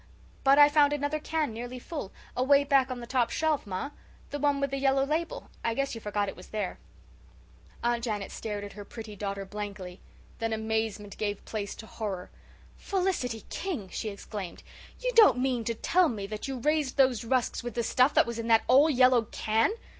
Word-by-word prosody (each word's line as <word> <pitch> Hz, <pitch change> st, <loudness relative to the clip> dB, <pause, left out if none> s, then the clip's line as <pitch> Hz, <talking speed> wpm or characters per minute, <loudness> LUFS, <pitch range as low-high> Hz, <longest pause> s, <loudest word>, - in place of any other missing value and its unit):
"But 275 Hz, +1 st, +6 dB
I 290 Hz, 0 st, +9 dB
found 290 Hz, -1 st, +4 dB
another 290 Hz, +1 st, -1 dB
can 305 Hz, -4 st, -1 dB
nearly 245 Hz, +3 st, -6 dB
full, 250 Hz, -, -6 dB, 0.2 s
away 280 Hz, +3 st, +4 dB
back 275 Hz, -2 st, +3 dB
on 250 Hz, -1 st, -4 dB
the -, -, -6 dB
top 240 Hz, -1 st, +1 dB
shelf, 310 Hz, -7 st, 0 dB
ma, 195 Hz, +9 st, -3 dB, 0.4 s
the 290 Hz, -, -3 dB
one 285 Hz, 0 st, +2 dB
with 280 Hz, -1 st, -1 dB
the 275 Hz, -, -1 dB
yellow 270 Hz, 0 st, +3 dB
label. 320 Hz, +3 st, -3 dB
I 230 Hz, -, 0 dB
guess 275 Hz, +1 st, -1 dB
you 225 Hz, -, -6 dB
forgot 205 Hz, -1 st, -1 dB
it -, -, -5 dB
was 180 Hz, -, -12 dB
there." 210 Hz, -4 st, -3 dB, 1.0 s
Aunt 235 Hz, 0 st, +1 dB
Janet 210 Hz, -4 st, -3 dB
stared 210 Hz, -2 st, -4 dB
at 205 Hz, -, -8 dB
her 205 Hz, -, -8 dB
pretty 215 Hz, 0 st, -9 dB
daughter 200 Hz, 0 st, -4 dB
blankly. 195 Hz, -3 st, -6 dB, 0.4 s
Then 225 Hz, -1 st, -1 dB
amazement 220 Hz, -2 st, -2 dB
gave 205 Hz, -2 st, -2 dB
place 205 Hz, -3 st, -4 dB
to 220 Hz, -, -10 dB
horror. 200 Hz, -5 st, -5 dB, 0.5 s
"Felicity 360 Hz, -, -1 dB
King!" 300 Hz, -, -4 dB
she 215 Hz, -, -3 dB
exclaimed. 200 Hz, -2 st, -7 dB, 0.4 s
"You -, -, -1 dB
don't 445 Hz, -, +7 dB
mean 250 Hz, -2 st, 0 dB
to 230 Hz, -, -1 dB
tell 350 Hz, +8 st, +3 dB
me 205 Hz, -4 st, -4 dB
that 210 Hz, +4 st, -5 dB
you 270 Hz, -1 st, -3 dB
raised 295 Hz, +1 st, 0 dB
those 260 Hz, -4 st, +4 dB
rusks 250 Hz, +1 st, 0 dB
with 240 Hz, -2 st, -6 dB
the 235 Hz, -, 0 dB
stuff 255 Hz, +5 st, +3 dB
that -, -, +6 dB
was 235 Hz, -1 st, -4 dB
in 230 Hz, -, -3 dB
that 225 Hz, -1 st, +5 dB
old 285 Hz, +5 st, +6 dB
yellow 255 Hz, -2 st, +5 dB
can?" 220 Hz, -, +1 dB
235 Hz, 200 wpm, -29 LUFS, 210-280 Hz, 1.0 s, I